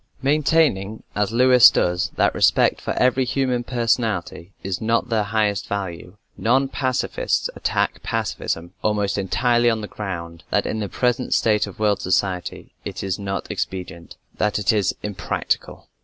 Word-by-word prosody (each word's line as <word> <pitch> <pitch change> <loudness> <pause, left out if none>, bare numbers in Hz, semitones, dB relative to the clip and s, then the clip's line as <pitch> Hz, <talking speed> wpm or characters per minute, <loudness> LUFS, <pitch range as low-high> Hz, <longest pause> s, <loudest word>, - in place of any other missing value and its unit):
Maintaining 140 -8 +2
as 105 0 0
Lewis 125 +1 +7
does 90 0 0
that - - +2
respect - - +3
for - - -2
every 130 +1 +2
human 125 -1 0
personality 115 -7 -1
is 95 -2 -3
not 115 +2 0
their 110 -2 +2
highest 105 -2 0
value, 95 -1 -5 0.2
non 130 +4 +2
pacifists 130 -2 -1
attack - - -1
pacifism 85 +2 -3
almost 105 -2 0
entirely 120 +5 +2
on 110 -1 0
the 105 - -5
ground 85 -6 -6
that - - +1
in 110 - -2
the 105 -2 -3
present 125 0 0
state 105 -2 +2
of 100 - -10
world 105 -2 +1
society 90 0 -2
it - - -6
is 95 -1 -2
not 95 -1 -4
expedient 90 -3 -5 0.2
that 105 -1 +1
it 105 +1 +2
is 105 -3 +1
"impractical." 105 -3 -3
105 Hz, 150 wpm, -22 LUFS, 95-120 Hz, 0.2 s, Lewis